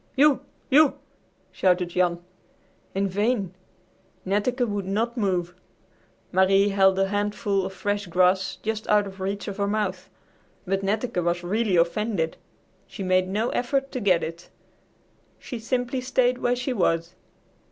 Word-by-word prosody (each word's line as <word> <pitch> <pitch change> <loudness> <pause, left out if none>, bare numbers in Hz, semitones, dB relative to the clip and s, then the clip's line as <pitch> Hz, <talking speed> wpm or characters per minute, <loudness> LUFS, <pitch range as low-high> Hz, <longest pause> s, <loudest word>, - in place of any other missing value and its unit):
"U 285 0 +5 0.3
U!" 295 +2 +5 0.5
shouted 180 -1 +1
Jan. 175 -1 0 0.7
In 195 +1 +1
vain! 205 -1 0 0.7
Netteke 240 +6 0
would 205 -3 -3
not 225 +5 -1
move. 180 -6 -1 0.8
Marie 195 +2 +4
held 190 -1 +4
a 195 0 +1
handful 205 -1 0
of - - -8
fresh 205 +1 -2
grass 185 +2 +2
just 220 0 -3
out 210 -1 +4
of 195 -1 -10
reach 200 +1 -3
of 200 -1 -5
her 200 -1 0
mouth. 200 -3 -2 0.6
But 195 +1 0
Netteke 205 -1 -1
was 175 +1 -1
really 205 +2 0
offended. 170 0 0 0.5
She 195 - -7
made 185 0 +2
no 210 +5 -1
effort 270 +2 -1
to 255 - -3
get 185 -6 +2
it. 165 +2 -7 0.9
She 245 - -7
simply 245 +2 -2
stayed 250 -1 +1
where 245 0 +1
she 255 +1 -2
was. 165 -5 0
200 Hz, 140 wpm, -25 LUFS, 185-225 Hz, 0.9 s, U